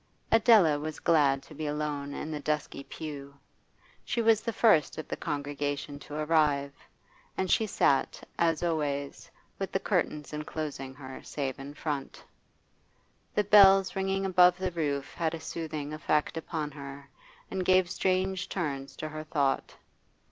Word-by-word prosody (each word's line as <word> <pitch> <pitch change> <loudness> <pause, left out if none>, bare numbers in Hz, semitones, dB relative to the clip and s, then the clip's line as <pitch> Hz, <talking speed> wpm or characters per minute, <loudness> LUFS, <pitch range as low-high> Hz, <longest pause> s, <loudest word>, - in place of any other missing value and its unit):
Adela 215 -10 +6
was 155 +1 -5
glad 140 -4 +3
to - - -14
be 150 +1 -4
alone 145 -1 -3
in 155 +2 -5
the 150 - -3
dusky 150 -2 -2
pew. 140 -2 -8 0.7
She - - -2
was 225 -1 +4
the 230 - -2
first 210 -9 +3
of 155 - -6
the - - -3
congregation 145 0 -3
to 145 +1 -9
arrive, 150 -3 +2 0.6
and 190 -1 0
she 220 - +3
sat, 140 -7 +1
as 165 -1 +2
always, 145 -4 -2 0.3
with - - -3
the - - 0
curtains 150 0 -1
enclosing 150 -3 -5
her 130 -1 -9
save 135 -3 -4
in 140 +2 -8
front. 145 -3 -4 1.1
The 210 - +3
bells 195 -2 +6
ringing 195 0 0
above 180 -1 +5
the 185 -1 -2
roof 145 -5 -2
had 165 -1 -1
a - - -7
soothing 155 -3 -5
effect 155 0 0
upon 160 -2 -4
her, 140 -1 -9 0.4
and 190 -1 -1
gave 185 0 +4
strange 190 0 0
turns 140 -7 -3
to 155 - -5
her 155 0 -6
thought. 145 -3 -1
155 Hz, 150 wpm, -29 LUFS, 145-180 Hz, 1.1 s, Adela